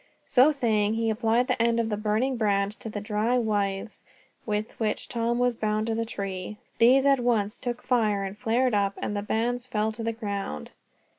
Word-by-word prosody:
So 265 +4 +5
saying, 220 -6 +1
he 225 0 +1
applied 230 +2 +1
the 255 -3 0
end 235 0 +2
of 225 -1 0
the 210 - 0
burning 215 +5 0
brand 200 -3 +1
to 225 - -6
the 210 - -4
dry 215 +4 0
withes 205 -3 -1 0.4
with 210 +1 -1
which 220 -2 -1
Tom 235 0 -1
was 245 -1 +1
bound 215 0 -1
to 225 - -1
the 230 +1 -1
tree. 195 -1 -5 0.2
These 260 +4 +6
at 275 -1 +4
once 225 -4 +1
took 245 0 -5
fire 215 -5 +1
and 195 0 -5
flared 240 +3 +1
up, 200 -1 +1
and 205 - -3
the 205 - -1
bands 240 +4 -1
fell 220 -2 0
to 220 +1 -7
the 225 0 -1
ground. 200 - -5
220 Hz, 200 wpm, -26 LUFS, 210-240 Hz, 0.4 s, These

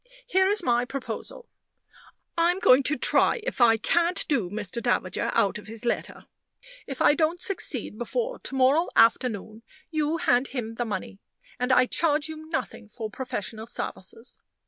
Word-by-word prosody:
Here 380 -6 +2
is 410 -1 +1
my 240 -3 +2
proposal. 280 - -6 0.9
I'm 345 +1 +2
going 275 -8 +5
to 305 - 0
try - - +3
if 485 - -4
I 225 -1 +6
can't 340 +8 0
do 235 - 0
Mr. 210 +3 -5
Davager 225 -6 -1
out 200 +1 +2
of 205 - -14
his 225 +2 -8
letter. 235 - -3 0.6
If 270 - -3
I - - +6
don't 325 +2 0
succeed 295 - -2
before - - -3
to - - -4
morrow 270 +6 +3
afternoon, 225 -2 +2 0.3
you 310 0 0
hand 250 -4 +2
him 230 -4 -5
the 240 +1 -3
money, 205 -2 -5 0.4
and 250 +1 0
I 255 0 +5
charge 305 +2 +2
you 315 0 -9
nothing 260 -7 -4
for 220 -1 -6
professional 220 -3 -5
services. 225 +1 -6
255 Hz, 160 wpm, -26 LUFS, 225-325 Hz, 0.9 s, I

